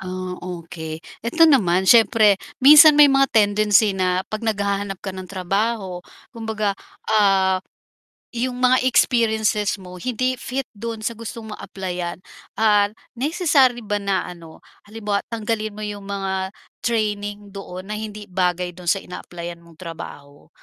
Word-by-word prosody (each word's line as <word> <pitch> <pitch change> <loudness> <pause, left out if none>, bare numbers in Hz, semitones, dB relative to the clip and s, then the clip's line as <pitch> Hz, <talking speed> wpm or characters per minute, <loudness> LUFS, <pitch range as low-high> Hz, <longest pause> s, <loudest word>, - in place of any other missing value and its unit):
Ah, 185 -1 -5
okey, 165 -2 -7 0.2
eto 235 +9 +1
naman 190 - +3
siyempre 220 -1 +5 0.2
minsan 300 +2 +9
may 290 -1 +8
mga 270 0 +4
tendency 210 0 +4
na 185 -1 0
'pag 215 - -3
naghahanap 200 -2 -1
ka 195 - -3
ng 185 0 -8
trabaho, 195 0 -2 0.3
kumbaga, 220 -3 -2 0.4
ah, 195 -3 +3 0.8
yung 245 +1 -2
mga 255 0 +4
experiences 220 -4 +2
mo 180 -1 -10
hindi 255 +4 -1
fit 260 +2 -4
do'n 225 +1 -6
sa 230 - -1
gustong 225 0 -8
mong - - -9
applyan, 180 -3 -5 0.4
ah, 210 -2 +4 0.3
necessary 275 -4 +2
ba 205 0 -1
na 195 -2 -1
ano, 165 -2 -12 0.3
halimbawa 210 -2 -2
tanggalin 215 -1 -2
mo 215 - -8
yung 205 -1 -6
mga 190 -1 -2 0.4
training 205 -3 -2
doon 185 -1 -8
na - - -2
hindi 210 -1 -7
bagay 180 -1 0
do'n 180 0 -9
sa 195 - 0
ina-applyan 175 -1 -8
mong 170 -1 -19
trabaho? 145 -4 -10
205 Hz, 140 wpm, -21 LUFS, 185-225 Hz, 0.8 s, minsan